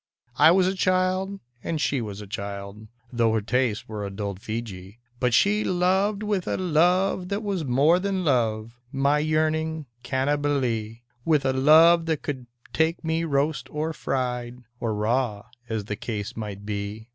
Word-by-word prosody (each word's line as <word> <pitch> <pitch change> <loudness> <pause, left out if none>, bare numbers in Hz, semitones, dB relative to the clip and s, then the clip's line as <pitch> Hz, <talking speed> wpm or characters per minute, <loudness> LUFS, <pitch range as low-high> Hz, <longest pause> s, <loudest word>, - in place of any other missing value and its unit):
I - - +8
was 180 +2 +5
a 185 - +1
child, 185 +1 0 0.2
and 165 -2 -2
she 140 -3 0
was 105 -2 -6
a - - -8
child 100 0 -6
— 120 +1 -27
Tho' 115 -2 +2
her 110 - +1
tastes 120 0 0
were 105 -1 -5
adult 100 -1 -4
Feejee 105 -3 -6
— 120 0 -36
But 125 0 +1
she 210 +1 +3
loved 190 +3 +1
with 205 -4 -1
a - - 0
love 180 +2 +2
that 200 +2 -2
was 195 -5 -2
more 140 +7 +4
than 190 -1 -1
love, 115 -4 0
My 140 +2 +2
yearning 155 0 0 0.2
Cannibalee; 130 -5 -1 0.2
With 150 -2 +2
a 130 - +2
love 165 +5 +6
that 160 -3 -1
could 130 -4 -5 0.3
take 160 +2 +1
me 165 +1 0
roast 150 0 0
or 155 +2 -2
fried 125 -3 -3 0.2
Or 110 -2 -1
raw, 110 0 0 0.2
as 110 -3 -2
the 105 - -3
case 105 -1 -5
might 100 -2 -6
be. 105 +2 -5
135 Hz, 170 wpm, -25 LUFS, 110-165 Hz, 0.3 s, I